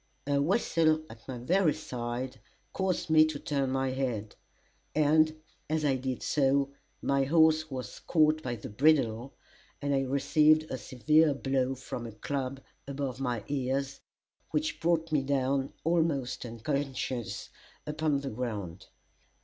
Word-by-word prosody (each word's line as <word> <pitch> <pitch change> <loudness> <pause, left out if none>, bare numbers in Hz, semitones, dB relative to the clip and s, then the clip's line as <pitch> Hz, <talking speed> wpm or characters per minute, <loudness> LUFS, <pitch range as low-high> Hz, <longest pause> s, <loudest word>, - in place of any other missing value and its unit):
A 140 0 +2
whistle 160 -2 +2
at 115 0 -14
my 130 -2 -5
very 165 +6 +2
side 120 +1 -5 0.3
caused 185 -4 -1
me 155 0 +8
to 155 -2 -3
turn 140 -2 -1
my 135 0 0
head, 120 -6 -3 0.6
and 155 +1 +4 0.3
as 155 -1 0
I 135 -2 +3
did 130 -1 -3
so, 140 -1 +2 0.3
my 140 -1 +2
horse 155 +1 +4
was 130 -6 -6
caught 155 -1 +3
by 120 -5 -3
the 110 - -8
bridle, 130 -1 +2 0.4
and 145 0 -1
I 135 - +2
received 150 +3 +4
a 130 - -2
severe 145 +7 +3
blow 135 -1 0
from 120 -2 -6
a - - -7
club 135 +4 -3 0.3
above 135 -2 -3
my 120 -5 -2
ears, 135 0 -1 0.5
which 155 0 -1
brought 165 -1 +1
me 150 -2 +3
down, 135 0 0
almost 160 -7 0
unconscious, 125 -3 -3 0.4
upon 150 -1 0
the 140 - -4
ground. 105 -7 -5
140 Hz, 140 wpm, -30 LUFS, 130-155 Hz, 0.6 s, me